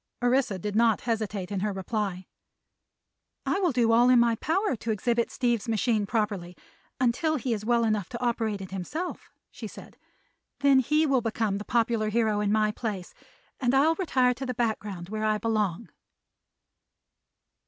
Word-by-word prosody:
Orissa 245 Hz, -5 st, +2 dB
did 205 Hz, +3 st, -4 dB
not 225 Hz, -1 st, +3 dB
hesitate 215 Hz, -5 st, -2 dB
in 200 Hz, -, -1 dB
her 210 Hz, +2 st, -1 dB
reply. 190 Hz, -1 st, -3 dB, 1.2 s
"I -, -, 0 dB
will 360 Hz, -4 st, +2 dB
do 235 Hz, -3 st, +2 dB
all 240 Hz, +2 st, +5 dB
in 255 Hz, -, +6 dB
my 235 Hz, -1 st, +4 dB
power 360 Hz, -, 0 dB
to 225 Hz, -, -6 dB
exhibit 235 Hz, +2 st, 0 dB
Steve's 240 Hz, -2 st, -1 dB
machine 220 Hz, -2 st, +1 dB
properly, 200 Hz, -6 st, -2 dB, 0.4 s
until 260 Hz, +6 st, +1 dB
he 255 Hz, -3 st, -1 dB
is 210 Hz, -2 st, -4 dB
well 235 Hz, +1 st, +2 dB
enough 215 Hz, -4 st, 0 dB
to 235 Hz, -, -6 dB
operate 225 Hz, -4 st, -1 dB
it 190 Hz, -, -8 dB
himself," 295 Hz, -, -5 dB, 0.2 s
she -, -, -7 dB
said. -, -, -12 dB, 0.6 s
"Then 280 Hz, -1 st, +5 dB
he 300 Hz, +5 st, +2 dB
will 270 Hz, -4 st, +2 dB
become 220 Hz, -3 st, -1 dB
the 210 Hz, -, -7 dB
popular 230 Hz, -2 st, +1 dB
hero 215 Hz, -1 st, +1 dB
in 205 Hz, -1 st, 0 dB
my 215 Hz, 0 st, +2 dB
place, 210 Hz, -5 st, -5 dB, 0.5 s
and 255 Hz, 0 st, +1 dB
I'll 300 Hz, +4 st, +5 dB
retire 265 Hz, -8 st, +2 dB
to 265 Hz, +2 st, -6 dB
the 250 Hz, -, -3 dB
background, 210 Hz, -6 st, -3 dB
where 215 Hz, +1 st, -3 dB
I 215 Hz, 0 st, +2 dB
belong." 215 Hz, -2 st, -1 dB
225 Hz, 165 wpm, -27 LUFS, 210-250 Hz, 1.2 s, in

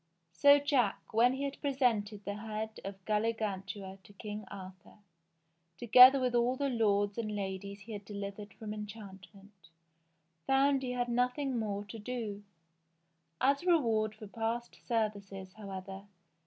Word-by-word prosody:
So 285 Hz, -, +6 dB
Jack, 280 Hz, -5 st, 0 dB
when 240 Hz, +3 st, +5 dB
he 270 Hz, +1 st, -3 dB
had 280 Hz, 0 st, -4 dB
presented 225 Hz, -7 st, 0 dB
the 200 Hz, -, -2 dB
head 220 Hz, +1 st, -5 dB
of 195 Hz, -1 st, -8 dB
Galligantua 205 Hz, -3 st, -2 dB
to 205 Hz, -, -17 dB
King 210 Hz, +1 st, -7 dB
Arthur, 190 Hz, -2 st, -11 dB, 0.8 s
together 250 Hz, +3 st, +8 dB
with 250 Hz, -1 st, 0 dB
all 240 Hz, +1 st, +2 dB
the 280 Hz, +1 st, -1 dB
lords 205 Hz, -3 st, +1 dB
and 215 Hz, -2 st, -3 dB
ladies 200 Hz, 0 st, -5 dB
he 220 Hz, +3 st, -11 dB
had 205 Hz, -1 st, -6 dB
delivered 200 Hz, 0 st, -7 dB
from 215 Hz, -1 st, -6 dB
enchantment, 205 Hz, -1 st, -10 dB, 0.9 s
found 270 Hz, 0 st, +3 dB
he 250 Hz, -2 st, -3 dB
had 245 Hz, 0 st, -1 dB
nothing 250 Hz, +3 st, 0 dB
more 205 Hz, -2 st, -3 dB
to 220 Hz, +2 st, -9 dB
do. 215 Hz, -3 st, -4 dB, 1.0 s
As 275 Hz, +1 st, +3 dB
a 360 Hz, -, -7 dB
reward 225 Hz, -10 st, +2 dB
for 215 Hz, -, -10 dB
past 230 Hz, +3 st, -3 dB
services, 200 Hz, -4 st, -2 dB
however. 195 Hz, -1 st, -8 dB
215 Hz, 140 wpm, -32 LUFS, 200-245 Hz, 1.0 s, together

